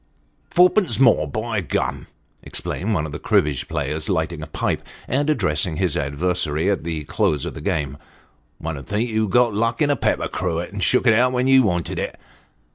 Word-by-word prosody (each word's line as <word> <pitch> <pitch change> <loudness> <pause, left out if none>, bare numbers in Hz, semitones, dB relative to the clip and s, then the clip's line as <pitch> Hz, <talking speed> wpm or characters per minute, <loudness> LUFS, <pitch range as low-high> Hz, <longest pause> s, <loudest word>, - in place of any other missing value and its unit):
" - - -41
Fourpence 180 0 +4
more, 115 - +5
by 110 +6 -2
gum! 85 - -2 0.2
" - - -41
exclaimed 105 +4 -3
one 80 - 0
of 75 - -6
the 75 - -6
cribbage 75 -3 +1
players, 75 0 -2
lighting - - -1
a - - -6
pipe, - - -2 0.3
and 145 +4 0
addressing 85 - +1
his 90 -4 0
adversary 80 +3 0
at 100 - -1
the 80 -2 -3
close 75 0 0
of - - -5
the - - -8
game; 70 -2 -2 0.6
"one 80 -2 -5
'ud 70 - -12
think 105 +4 0
you'd 110 -2 0
got 120 +2 +3
luck 115 +2 0
in 145 -2 +3
a - - +2
pepper - - 0
cruet, 85 +2 -3
and 100 - -4
shook 125 - +2
it 115 - +6
out 125 +3 +3
when 125 0 +1
you 135 0 +6
wanted 90 -7 -1
it." - - -4
95 Hz, 200 wpm, -22 LUFS, 75-120 Hz, 0.6 s, it